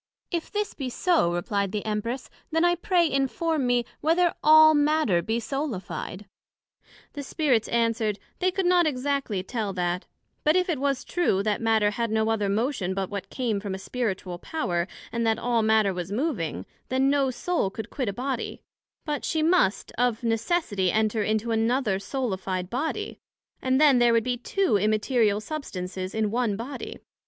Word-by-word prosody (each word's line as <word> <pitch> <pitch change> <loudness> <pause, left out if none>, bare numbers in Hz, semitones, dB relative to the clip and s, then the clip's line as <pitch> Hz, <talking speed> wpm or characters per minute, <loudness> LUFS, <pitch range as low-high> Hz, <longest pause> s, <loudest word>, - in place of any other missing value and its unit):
If 340 -3 -3
this 415 0 -2
be 270 -3 -4
so, 325 - +2
replied 200 +2 -1
the 210 0 -3
Empress, 230 +4 -3 0.2
then 325 +1 +2
I 350 - +4
pray 350 0 +2
inform 275 +1 0
me, 245 -1 +2
Whether 335 +2 +2
all 315 0 +8
matter 295 - +3
be 225 +5 -1
soulified? 225 -6 -4 0.9
The 290 - -5
Spirits 270 -5 +1
answered, 230 -3 +1 0.2
They 370 - +2
could 380 0 -1
not 355 -2 +4
exactly 270 -7 -1
tell 215 -2 -3
that; 180 0 -2 0.4
but 305 +2 +4
if 365 0 +2
it 315 -6 0
was 275 -1 0
true, 270 - +1
that 210 0 0
Matter 220 -2 +3
had 230 +2 -2
no 220 0 +1
other 210 -3 0
motion 205 -3 -1
but 195 0 -3
what 200 -1 -5
came 235 -6 -1
from 200 -2 -4
a - - -5
spiritual 190 -4 -3
power, 175 - -2 0.2
and 235 0 -1
that 220 0 +2
all 235 -1 +1
matter 215 -2 +3
was 180 +1 -5
moving, 205 - -2 0.2
then 265 +1 +2
no 280 -2 +2
soul 320 - -1
could 220 +3 -7
quit 255 -7 -2
a - - -3
Body, 255 +2 -4 0.4
but 295 -2 -2
she 315 -1 0
must, 320 - +2
of 245 -2 +1
necessity 225 - 0
enter 220 0 +1
into 220 +2 0
another 225 -2 +1
soulified 195 -5 -3
Body, 320 - -3 0.4
and 260 0 +2
then 290 -4 +6
there 240 -1 +5
would 230 -1 +3
be 250 +1 0
two 325 - +1
immaterial 215 +1 +2
substances 190 -9 -5
in 215 -2 0
one 235 -3 0
Body. 250 +5 -6
235 Hz, 170 wpm, -26 LUFS, 205-285 Hz, 0.9 s, all